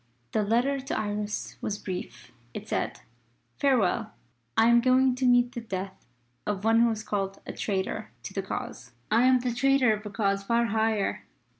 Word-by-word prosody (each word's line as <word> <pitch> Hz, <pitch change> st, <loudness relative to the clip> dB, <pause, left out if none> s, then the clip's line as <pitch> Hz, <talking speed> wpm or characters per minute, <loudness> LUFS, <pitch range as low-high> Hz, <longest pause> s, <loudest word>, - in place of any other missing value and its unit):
The 215 Hz, -, +1 dB
letter 240 Hz, +7 st, +1 dB
to 270 Hz, -, -3 dB
Iris 210 Hz, 0 st, -3 dB
was 205 Hz, -, -2 dB
brief. 185 Hz, -2 st, -7 dB, 0.2 s
It -, -, -6 dB
said: -, -, -2 dB, 0.6 s
"Farewell! 250 Hz, -10 st, +1 dB, 0.4 s
I 225 Hz, -, +6 dB
am 235 Hz, 0 st, +6 dB
going 255 Hz, +1 st, +4 dB
to 255 Hz, 0 st, 0 dB
meet 245 Hz, 0 st, +4 dB
the 235 Hz, -, -5 dB
death 190 Hz, -, -6 dB, 0.4 s
of 205 Hz, -1 st, -2 dB
one 225 Hz, +1 st, +4 dB
who 235 Hz, 0 st, +5 dB
is 220 Hz, -1 st, -3 dB
called 195 Hz, -2 st, -2 dB
a -, -, -6 dB
Traitor 190 Hz, -, -2 dB
to 120 Hz, -, -7 dB
the 195 Hz, -, -1 dB
Cause. 190 Hz, -, -6 dB, 0.2 s
I 230 Hz, +3 st, +5 dB
am 255 Hz, -1 st, +4 dB
the 245 Hz, -1 st, -1 dB
Traitor 265 Hz, -1 st, +3 dB
of 210 Hz, 0 st, -5 dB
a 210 Hz, -, -6 dB
Cause 200 Hz, -1 st, 0 dB
far 235 Hz, +4 st, +1 dB
higher. 220 Hz, -2 st, 0 dB
225 Hz, 180 wpm, -27 LUFS, 200-245 Hz, 0.6 s, I